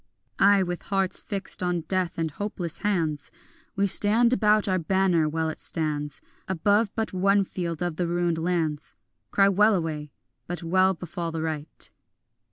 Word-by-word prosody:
Ay, 200 Hz, 0 st, +5 dB
with 175 Hz, -1 st, -4 dB
hearts 195 Hz, -2 st, +1 dB
fixed 200 Hz, -3 st, -3 dB
on 180 Hz, -1 st, 0 dB
death 180 Hz, +1 st, -1 dB
and 165 Hz, -1 st, -1 dB
hopeless 175 Hz, -2 st, -5 dB
hands 165 Hz, -8 st, -1 dB, 0.5 s
We 200 Hz, -, +2 dB
stand 220 Hz, +5 st, +4 dB
about 215 Hz, -3 st, +3 dB
our 185 Hz, -1 st, +1 dB
banner 175 Hz, -2 st, +2 dB
while 160 Hz, +1 st, -1 dB
it 160 Hz, -, -5 dB
stands 150 Hz, -3 st, -2 dB, 0.3 s
Above 205 Hz, +4 st, +2 dB
but 225 Hz, -3 st, -2 dB
one 195 Hz, +2 st, +3 dB
field 175 Hz, -3 st, -4 dB
of 175 Hz, -3 st, -3 dB
the 175 Hz, -, 0 dB
ruined 175 Hz, -1 st, 0 dB
lands; 160 Hz, -3 st, -2 dB, 0.3 s
Cry 195 Hz, -1 st, +4 dB
wellaway, 175 Hz, -7 st, +1 dB, 0.4 s
but 175 Hz, 0 st, -5 dB
well 185 Hz, +3 st, +3 dB
befall 170 Hz, 0 st, -5 dB
the 160 Hz, -1 st, -3 dB
right. 155 Hz, -1 st, -4 dB
175 Hz, 155 wpm, -26 LUFS, 160-195 Hz, 0.5 s, Ay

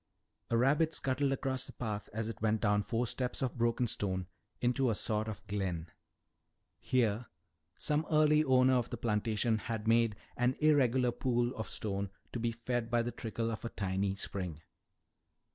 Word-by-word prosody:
A 115 Hz, -, +2 dB
rabbit 150 Hz, +6 st, +3 dB
scuttled 135 Hz, +1 st, +1 dB
across 135 Hz, -1 st, -1 dB
the -, -, -9 dB
path 105 Hz, -4 st, -4 dB
as 110 Hz, +1 st, -3 dB
it 115 Hz, -3 st, -6 dB
went 110 Hz, 0 st, +1 dB
down 105 Hz, -1 st, +3 dB
four 115 Hz, +3 st, -1 dB
steps 125 Hz, +3 st, -2 dB
of 130 Hz, -, -1 dB
broken 120 Hz, +1 st, +1 dB
stone 95 Hz, -4 st, -1 dB, 0.3 s
into 125 Hz, +1 st, +2 dB
a 110 Hz, -, +1 dB
sort 110 Hz, +1 st, 0 dB
of 105 Hz, -2 st, -6 dB
glen. 90 Hz, -5 st, -3 dB, 0.9 s
Here 120 Hz, -2 st, +1 dB, 0.5 s
some 150 Hz, +1 st, 0 dB
early 150 Hz, -1 st, +5 dB
owner 130 Hz, -2 st, +5 dB
of 120 Hz, -1 st, -1 dB
the 120 Hz, -, -4 dB
plantation 110 Hz, 0 st, +1 dB
had 110 Hz, 0 st, -4 dB
made 115 Hz, -1 st, +4 dB, 0.2 s
an 125 Hz, +1 st, +2 dB
irregular 130 Hz, -5 st, +4 dB
pool 120 Hz, 0 st, 0 dB
of 110 Hz, -, -4 dB
stone 100 Hz, -2 st, -3 dB, 0.2 s
to 120 Hz, -, -3 dB
be 115 Hz, 0 st, 0 dB
fed 120 Hz, 0 st, -2 dB
by 120 Hz, 0 st, +2 dB
the 120 Hz, -, -2 dB
trickle 115 Hz, 0 st, -3 dB
of 110 Hz, -, -5 dB
a 115 Hz, -, -3 dB
tiny 95 Hz, -1 st, -1 dB
spring. 90 Hz, -5 st, -5 dB
115 Hz, 170 wpm, -33 LUFS, 105-125 Hz, 0.9 s, early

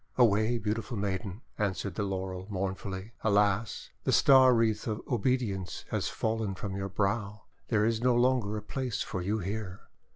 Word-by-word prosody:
"Away, 115 Hz, 0 st, +4 dB
beautiful 115 Hz, +2 st, -3 dB
maiden," 100 Hz, +1 st, -3 dB, 0.2 s
answered 100 Hz, -2 st, -1 dB
the 105 Hz, -, -3 dB
Laurel 95 Hz, -1 st, -3 dB
mournfully. 95 Hz, +1 st, -4 dB
"Alas! 105 Hz, 0 st, +1 dB
the -, -, +1 dB
star 130 Hz, -2 st, +7 dB
wreath 115 Hz, -1 st, +1 dB
of 110 Hz, -1 st, -1 dB
obedience 115 Hz, -6 st, -1 dB
has -, -, 0 dB
fallen 110 Hz, -3 st, -1 dB
from 100 Hz, -1 st, -5 dB
your 95 Hz, 0 st, -3 dB
brow. 100 Hz, +1 st, -1 dB, 0.2 s
There 110 Hz, -2 st, +2 dB
is 115 Hz, 0 st, +1 dB
no 125 Hz, 0 st, +3 dB
longer 120 Hz, -4 st, +2 dB
a 105 Hz, -, -6 dB
place 125 Hz, +1 st, -3 dB
for 95 Hz, -, -4 dB
you 100 Hz, +5 st, 0 dB
here." 100 Hz, -1 st, -4 dB
105 Hz, 160 wpm, -30 LUFS, 95-115 Hz, 0.2 s, star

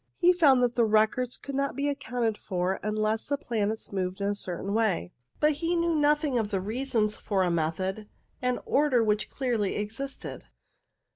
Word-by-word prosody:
He 360 Hz, 0 st, +5 dB
found 275 Hz, -8 st, +5 dB
that 245 Hz, -1 st, +2 dB
the 235 Hz, -, +3 dB
records 220 Hz, +3 st, +2 dB
could 280 Hz, -, -8 dB
not 275 Hz, 0 st, -1 dB
be 280 Hz, +2 st, -1 dB
accounted 245 Hz, -5 st, -1 dB
for 185 Hz, -2 st, -2 dB
unless 215 Hz, +1 st, -1 dB
the 285 Hz, -, 0 dB
planets 220 Hz, -4 st, -2 dB
moved 190 Hz, -1 st, -2 dB
in 200 Hz, 0 st, 0 dB
a -, -, +1 dB
certain 195 Hz, 0 st, -1 dB
way, 210 Hz, -, 0 dB, 0.3 s
but 300 Hz, -, +4 dB
he 330 Hz, +4 st, -1 dB
knew 335 Hz, 0 st, +1 dB
nothing 295 Hz, -3 st, +2 dB
of 215 Hz, -2 st, -1 dB
the 195 Hz, -2 st, 0 dB
reasons 215 Hz, +1 st, -1 dB
for 195 Hz, -3 st, 0 dB
a 180 Hz, -, +1 dB
method 185 Hz, +6 st, -2 dB, 0.3 s
and 250 Hz, 0 st, 0 dB
order 275 Hz, -4 st, +3 dB
which 210 Hz, -2 st, 0 dB
clearly 235 Hz, -7 st, -1 dB
existed. 225 Hz, +7 st, -5 dB
225 Hz, 180 wpm, -28 LUFS, 205-275 Hz, 0.3 s, He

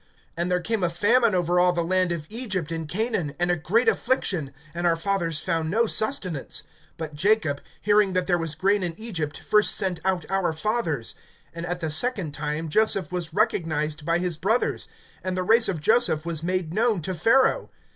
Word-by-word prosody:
(11)And 170 Hz, +2 st, -1 dB
there 180 Hz, 0 st, +2 dB
came 215 Hz, +4 st, -1 dB
a 175 Hz, -, +2 dB
famine 220 Hz, +5 st, +3 dB
over 175 Hz, 0 st, +2 dB
all 180 Hz, 0 st, +4 dB
the 170 Hz, -1 st, 0 dB
land 185 Hz, +1 st, +1 dB
of 165 Hz, -3 st, -3 dB
Egypt 200 Hz, -8 st, -2 dB
and 165 Hz, -1 st, -4 dB
Canaan, 185 Hz, -7 st, -1 dB
and 175 Hz, 0 st, +1 dB
a -, -, +2 dB
great 200 Hz, +10 st, +1 dB
affliction; 185 Hz, -, 0 dB, 0.2 s
and 175 Hz, +1 st, 0 dB
our 165 Hz, -, +3 dB
fathers 170 Hz, -2 st, -1 dB
found 165 Hz, -2 st, -1 dB
no 225 Hz, +6 st, +2 dB
sustenance. 200 Hz, -, -2 dB, 0.3 s
(12)But 160 Hz, -2 st, -6 dB
Jacob, 160 Hz, -3 st, +1 dB, 0.2 s
hearing 205 Hz, -2 st, +3 dB
that 185 Hz, -1 st, +1 dB
there 175 Hz, -1 st, +1 dB
was 165 Hz, -2 st, -3 dB
grain 200 Hz, +3 st, +2 dB
in 175 Hz, -2 st, -2 dB
Egypt, 165 Hz, -10 st, -3 dB
first 210 Hz, 0 st, +3 dB
sent 185 Hz, -3 st, 0 dB
out 185 Hz, -4 st, 0 dB
our 190 Hz, -4 st, 0 dB
fathers. 160 Hz, -, -2 dB, 0.4 s
(13)And 170 Hz, +1 st, -5 dB
at 175 Hz, 0 st, -3 dB
the 160 Hz, -2 st, -2 dB
second 190 Hz, -1 st, -1 dB
time, 150 Hz, +2 st, -3 dB
Joseph 195 Hz, -1 st, +1 dB
was 175 Hz, -3 st, -3 dB
recognized 160 Hz, -6 st, 0 dB
by 165 Hz, +2 st, +1 dB
his 175 Hz, -2 st, -2 dB
brothers; 220 Hz, +9 st, 0 dB, 0.4 s
and 185 Hz, 0 st, -2 dB
the 185 Hz, -, 0 dB
race 225 Hz, +5 st, +5 dB
of 180 Hz, -5 st, -2 dB
Joseph 220 Hz, -4 st, +2 dB
was 165 Hz, -2 st, -2 dB
made 180 Hz, -1 st, -2 dB
known 215 Hz, -4 st, +1 dB
to 185 Hz, -, -3 dB
Pharaoh. 245 Hz, -, +3 dB
180 Hz, 195 wpm, -25 LUFS, 165-210 Hz, 0.4 s, race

